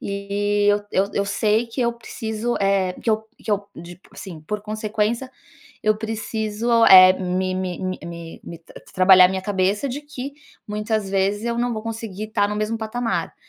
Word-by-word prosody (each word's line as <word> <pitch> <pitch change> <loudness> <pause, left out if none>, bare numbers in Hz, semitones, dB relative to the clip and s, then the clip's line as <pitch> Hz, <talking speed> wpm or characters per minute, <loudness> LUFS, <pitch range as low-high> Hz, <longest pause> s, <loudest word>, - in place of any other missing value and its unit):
e 205 +1 -1
eu 205 0 +3
eu 200 +2 +1
eu 200 - 0
sei 215 +3 +1
que 230 +3 -5
eu 235 0 +1
preciso, 230 0 -4
eh, 195 -2 +1
que 225 - -2
eu 215 0 +1
que - - -7
eu 205 -1 -1
de 175 +1 -11
assim, 175 -6 -9
por 205 +6 -5
consequência, 215 +3 -2 0.5
eu 215 -1 +3
preciso, 220 +1 0
eh, 185 -1 +10
me 185 0 -2
me 185 -2 -3
me 185 0 -3
me 170 -1 -9
me 170 - -9
t 170 - -19
tra - - -13
trabalhar 185 -1 +7
minha 190 0 -3
cabeça 200 +4 0
de 270 +2 -4
que 280 -2 -7 0.3
muitas 210 -1 -2
vezes 200 +3 0
eu 235 0 -1
não 240 0 0
vou 215 - -5
conseguir 225 -3 -5
estar 205 -1 0
no 210 - -3
mesmo 215 +2 -2
patamar. 230 +1 -3
210 Hz, 185 wpm, -22 LUFS, 190-225 Hz, 0.5 s, eh